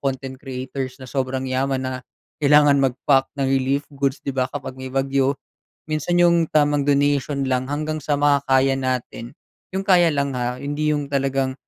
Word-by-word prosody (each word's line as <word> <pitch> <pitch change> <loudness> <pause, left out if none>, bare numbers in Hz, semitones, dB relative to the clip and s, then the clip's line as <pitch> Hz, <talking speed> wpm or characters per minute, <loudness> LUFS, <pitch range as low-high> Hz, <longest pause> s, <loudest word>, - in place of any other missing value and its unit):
content 135 -1 -3
creators 130 -1 -5
na 130 - -9
sobrang 130 -1 -2
yaman 130 +1 0
na 130 - -2 0.5
kailangan 145 -1 +5
mag-pack 135 +1 +2
ng 135 - +1
relief 135 +2 +1
goods, 140 0 -1
'di 140 - -1
ba 130 0 +2
kapag 145 -2 -6
may 130 - -6
bagyo. 135 0 +1 0.5
Minsan 155 +3 0
'yong 170 -2 +4
tamang 145 -1 +3
donation 140 0 +1
lang 130 0 0
hanggang 155 +1 -2
sa 145 0 0
makakaya 135 -2 +3
natin. 125 -1 -3 0.4
'Yong 190 - -1
kaya 175 -3 +5
lang 140 -1 -1
ha, 125 +1 -2
hindi 145 +2 -1
'yong 145 -1 -3
talagang 135 -1 0
135 Hz, 165 wpm, -22 LUFS, 130-145 Hz, 0.5 s, kailangan